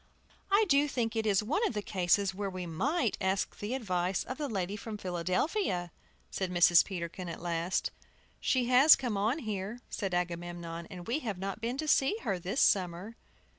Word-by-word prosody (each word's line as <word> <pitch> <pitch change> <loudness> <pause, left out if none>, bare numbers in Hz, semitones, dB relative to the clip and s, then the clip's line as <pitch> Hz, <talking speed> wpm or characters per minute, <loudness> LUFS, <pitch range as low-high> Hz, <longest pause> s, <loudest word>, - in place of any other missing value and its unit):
"I 405 +2 +4
do 285 -2 +4
think 235 -5 -2
it 220 -1 0
is 205 0 +3
one 305 - 0
of - - -5
the 210 - -2
cases 190 +1 +1
where 200 +1 -3
we 185 -1 -5
might 240 - 0
ask 190 0 -1
the 210 +5 -3
advice 185 -6 -1
of 255 - -7
the 290 -2 -2
lady 195 -2 -2
from 215 0 -6
Philadelphia," 180 - -1 0.4
said 190 -2 -2
Mrs. 175 -1 +6
Peterkin, 180 -1 -5
at 165 - -6
last. 170 +1 -1 0.5
"She 255 -2 +1
has 255 +5 +8
come 245 -5 -3
on 215 +7 +1
here," 215 -3 -4
said 195 -4 -2
Agamemnon, 170 -1 -4
"and 180 -3 -9
we 240 +8 -1
have 220 -10 -4
not 195 +3 -5
been 240 +3 -2
to 310 +2 -3
see 285 +7 +3
her 195 -6 -1
this 190 +9 -1
summer." 185 +3 +1
200 Hz, 185 wpm, -31 LUFS, 180-245 Hz, 0.5 s, has